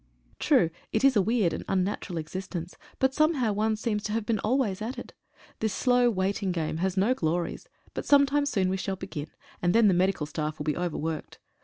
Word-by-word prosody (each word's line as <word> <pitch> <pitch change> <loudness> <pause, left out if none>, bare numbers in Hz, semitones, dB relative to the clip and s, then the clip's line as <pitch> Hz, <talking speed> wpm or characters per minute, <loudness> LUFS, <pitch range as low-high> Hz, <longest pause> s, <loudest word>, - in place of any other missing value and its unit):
True 165 - +3 0.2
it 220 - 0
is 275 -2 +5
a 205 - +5
weird 210 -3 +1
and - - -4
unnatural 185 -2 -1
existence, 175 +1 -5 0.2
but 265 -1 +2
somehow' 290 -7 +2
one 215 +2 +1
seems 215 -1 -1
to 210 - -2
have 225 -1 -1
been 225 -2 0
always 215 -4 0
at 240 +4 -4
it. 245 - -8 0.5
This 220 -3 -1
slow 245 -1 +3
waiting 195 -1 0
game 160 -3 -2
has 190 +2 -1
no 205 +7 +3
glories, 170 -5 -2 0.3
but - - -5
some 280 -1 +7
time 285 +1 +1
soon 195 -9 +1
we 190 - 0
shall 190 +1 -2
begin, 155 -4 -6 0.3
and 175 +2 +2
then 230 -2 +6
the 195 - +5
medical 180 -3 +1
staff 155 0 -3
will - - -4
be 150 -1 0
overworked. 165 -2 -3
195 Hz, 205 wpm, -27 LUFS, 175-230 Hz, 0.5 s, some